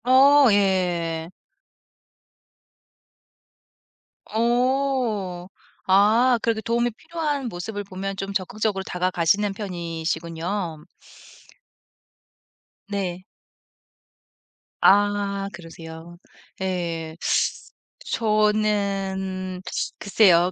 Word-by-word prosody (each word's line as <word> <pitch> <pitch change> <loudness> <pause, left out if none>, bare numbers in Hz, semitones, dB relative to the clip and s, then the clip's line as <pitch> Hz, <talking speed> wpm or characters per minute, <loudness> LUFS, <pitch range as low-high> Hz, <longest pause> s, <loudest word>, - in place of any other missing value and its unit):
어 270 +2 +7
예. 175 -4 +1 3.0
어. 235 -6 0 0.4
아 220 +6 +5
그렇게 225 -1 0
도움이 235 +1 0
필요한 295 +1 -3
모습을 205 +3 -5
보면 195 0 -5
좀 195 +1 -5
적극적으로 195 +1 -1
다가가시는 185 +3 +1
편이시군요. 170 -2 -4 2.0
네. 185 -3 -3 1.6
아 200 0 +3
그러세요? 165 0 -10 0.4
예. 170 -4 -3 1.0
저는 200 -4 0 0.4
글쎄요. 185 -3 +4
195 Hz, 135 characters per minute, -24 LUFS, 175-215 Hz, 3.0 s, 어